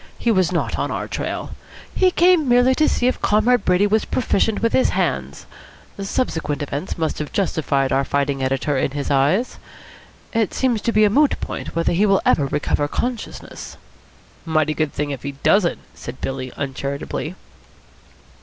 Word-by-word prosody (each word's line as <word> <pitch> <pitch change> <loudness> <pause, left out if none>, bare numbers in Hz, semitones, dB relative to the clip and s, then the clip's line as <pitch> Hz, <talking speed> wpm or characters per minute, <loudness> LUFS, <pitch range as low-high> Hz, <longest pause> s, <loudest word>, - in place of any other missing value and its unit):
He 235 - +1
was 185 -4 +2
not 175 - -1
on - - -1
our - - -3
trail. - - -4 0.4
He 370 - +4
came 350 -5 +3
merely 245 +2 +5
to 305 +3 +3
see 245 - 0
if 255 - +1
Comrade 215 +2 +3
Brady 180 +2 +3
was 215 +1 +2
proficient 225 -3 0
with 230 - +2
his 260 - +3
hands. - - -2 0.5
Subsequent 165 - -2
events 145 +5 -4
must 160 -2 -2
have 150 - -4
justified 150 -8 0
our 135 - +2
fighting 140 0 -1
editor 135 +2 0
in 130 - +1
his 145 -1 -3
eyes. 145 - +1 0.7
It 225 -4 0
seems 245 -5 +1
to 230 - 0
be 215 -1 +4
a 210 - +5
moot 290 +5 +3
point - - -6
whether 165 +1 +1
he 200 +5 +3
will 195 -1 +3
ever 140 - +3
recover 145 +1 0
consciousness." 240 +9 -5 0.7
"Mighty 155 -2 +1
good 155 -2 -1
thing 145 -1 -3
if 135 -4 -5
he 140 0 -5
doesn't," 135 - +2 0.2
said - - -9
Billy 130 -1 -4
uncharitably. 140 +4 -4
175 Hz, 170 wpm, -21 LUFS, 140-230 Hz, 0.7 s, merely